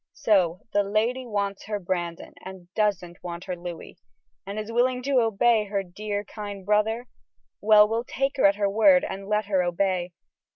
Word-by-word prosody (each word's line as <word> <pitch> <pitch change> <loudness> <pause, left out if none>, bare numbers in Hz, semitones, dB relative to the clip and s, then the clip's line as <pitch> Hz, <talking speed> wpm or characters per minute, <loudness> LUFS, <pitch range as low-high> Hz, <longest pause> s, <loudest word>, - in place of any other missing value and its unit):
So 190 - +2
the 205 - +4
lady 225 +6 -1
wants 200 -2 -3
her 210 0 -2
Brandon, 175 -3 -4
and 185 -1 -11
doesn't 185 -5 -1
want 175 0 -6
her 180 - -4
Louis, 175 -1 -9 0.5
yet 200 +1 -5
is 215 +1 -4
willing 250 +2 +1
to 270 -2 +3
obey 225 0 +2
her 200 -1 -2
dear, 205 +3 -4
kind 205 -2 -8
brother? 215 +3 +1 0.6
Well, 210 0 +6
we'll 225 +2 -2
take 270 +2 -2
her 260 - +6
at 200 - +2
her 205 -1 0
word 225 +7 +5
and 195 +1 -7
let 210 0 0
her 195 -2 +1
obey. 180 0 -1
205 Hz, 175 wpm, -25 LUFS, 185-220 Hz, 0.6 s, Well